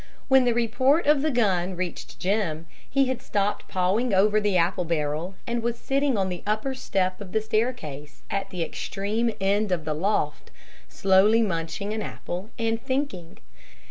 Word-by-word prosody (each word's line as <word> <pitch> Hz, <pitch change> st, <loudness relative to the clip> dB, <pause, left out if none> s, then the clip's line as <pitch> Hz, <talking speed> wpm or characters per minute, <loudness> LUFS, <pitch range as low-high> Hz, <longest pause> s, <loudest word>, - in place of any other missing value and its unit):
When 265 Hz, -1 st, +6 dB
the 240 Hz, -, +3 dB
report 260 Hz, +7 st, +2 dB
of 295 Hz, -1 st, +4 dB
the 310 Hz, -, +1 dB
gun 190 Hz, -, +1 dB
reached 180 Hz, -1 st, -5 dB
Jim, 180 Hz, -5 st, -1 dB, 0.2 s
he 275 Hz, 0 st, +3 dB
had 255 Hz, -1 st, -2 dB
stopped 205 Hz, 0 st, -1 dB
pawing 195 Hz, +5 st, +1 dB
over 210 Hz, +2 st, +4 dB
the 205 Hz, -3 st, +2 dB
apple 180 Hz, +2 st, +2 dB
barrel, 160 Hz, +2 st, -2 dB
and 235 Hz, 0 st, -1 dB
was 235 Hz, 0 st, -1 dB
sitting 275 Hz, -2 st, +1 dB
on 190 Hz, -1 st, +1 dB
the 180 Hz, -1 st, -5 dB
upper 215 Hz, +6 st, -1 dB
step 185 Hz, -6 st, -1 dB
of 190 Hz, -3 st, -9 dB
the 220 Hz, -, +3 dB
staircase 215 Hz, -, -3 dB
at 195 Hz, -1 st, -2 dB
the 180 Hz, -2 st, -2 dB
extreme 210 Hz, +7 st, -2 dB
end 200 Hz, +1 st, +1 dB
of 170 Hz, -3 st, 0 dB
the 155 Hz, -, -1 dB
loft, 155 Hz, -2 st, -1 dB, 0.4 s
slowly 195 Hz, +4 st, +4 dB
munching 190 Hz, +2 st, -2 dB
an 220 Hz, -, -2 dB
apple 185 Hz, 0 st, -5 dB
and 225 Hz, -1 st, 0 dB
thinking. 260 Hz, -, -3 dB
205 Hz, 170 wpm, -26 LUFS, 180-235 Hz, 0.4 s, When